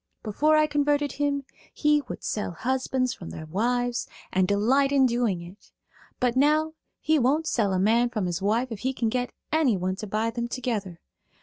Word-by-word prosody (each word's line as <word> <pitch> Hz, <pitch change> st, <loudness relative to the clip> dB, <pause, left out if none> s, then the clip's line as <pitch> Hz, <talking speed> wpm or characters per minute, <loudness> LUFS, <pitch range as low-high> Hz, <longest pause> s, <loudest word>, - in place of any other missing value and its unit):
Before 300 Hz, +9 st, +2 dB
I 305 Hz, -, +5 dB
converted 290 Hz, -1 st, +1 dB
him 285 Hz, 0 st, -1 dB, 0.3 s
he 300 Hz, -1 st, +2 dB
would -, -, -7 dB
sell 210 Hz, -4 st, -2 dB
husbands 255 Hz, +4 st, -1 dB
from 170 Hz, -, -9 dB
their 160 Hz, -, -7 dB
wives 245 Hz, +8 st, -1 dB, 0.3 s
and 185 Hz, 0 st, +3 dB
delight 250 Hz, +8 st, +2 dB
in 275 Hz, -2 st, +4 dB
doing 235 Hz, -8 st, 0 dB
it; 180 Hz, +4 st, -14 dB, 0.5 s
but 250 Hz, -1 st, +1 dB
now 305 Hz, +3 st, +3 dB, 0.3 s
he 315 Hz, 0 st, +2 dB
won't 280 Hz, +6 st, +2 dB
sell 215 Hz, -9 st, +1 dB
a 190 Hz, -, +1 dB
man 230 Hz, +5 st, +3 dB
from 215 Hz, -5 st, -2 dB
his 175 Hz, +1 st, -2 dB
wife 230 Hz, +6 st, 0 dB
if 220 Hz, -, -5 dB
he 260 Hz, +4 st, -1 dB
can 235 Hz, -3 st, -1 dB
get 250 Hz, +2 st, -2 dB, 0.2 s
anyone 205 Hz, -, +1 dB
to 215 Hz, -, -6 dB
buy 215 Hz, +3 st, -1 dB
them 235 Hz, 0 st, -3 dB
together. 220 Hz, -8 st, -3 dB
245 Hz, 185 wpm, -26 LUFS, 205-280 Hz, 0.5 s, I